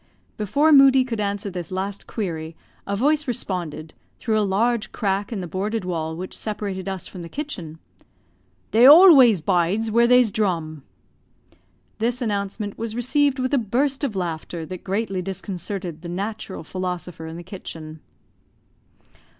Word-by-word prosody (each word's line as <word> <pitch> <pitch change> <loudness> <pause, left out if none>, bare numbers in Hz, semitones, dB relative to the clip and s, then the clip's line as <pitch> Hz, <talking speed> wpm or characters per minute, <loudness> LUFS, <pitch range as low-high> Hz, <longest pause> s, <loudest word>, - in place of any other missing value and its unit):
Before 285 +10 +2
Moodie 270 -2 +7
could 230 -4 -4
answer 200 -1 -2
this 175 -3 -5
last 195 +2 -4
query 165 -6 -4 0.3
a 200 - -1
voice 295 +7 +1
responded, 170 -9 -4 0.2
through 220 -3 0
a - - +2
large 215 +2 0
crack 200 0 -1
in 210 -5 -3
the 180 - -5
boarded 200 +4 -3
wall 160 -3 -3
which 185 +3 -7
separated 200 -3 -4
us 190 -2 -5
from 185 - -9
the 170 - -8
kitchen, 185 - -6 0.9
"They 235 +4 +7
always 280 - +8
bides 190 +6 +1
where 235 +2 +4
they's 250 -3 +5
drum." 165 -8 -1 1.2
This 235 +2 0
announcement 205 -2 -3
was 225 -1 -4
received 275 +3 +2
with 255 +1 -2
a 280 - +4
burst 265 +6 0
of 250 -8 -1
laughter 170 -2 -4
that 185 +1 -8
greatly 195 -1 -2
disconcerted 185 -2 -5
the 170 - -7
natural 200 +1 -5
philosopher 180 -2 -5
in 160 +1 -7
the 175 - -8
kitchen. 160 -4 -9
200 Hz, 150 wpm, -23 LUFS, 180-235 Hz, 1.2 s, always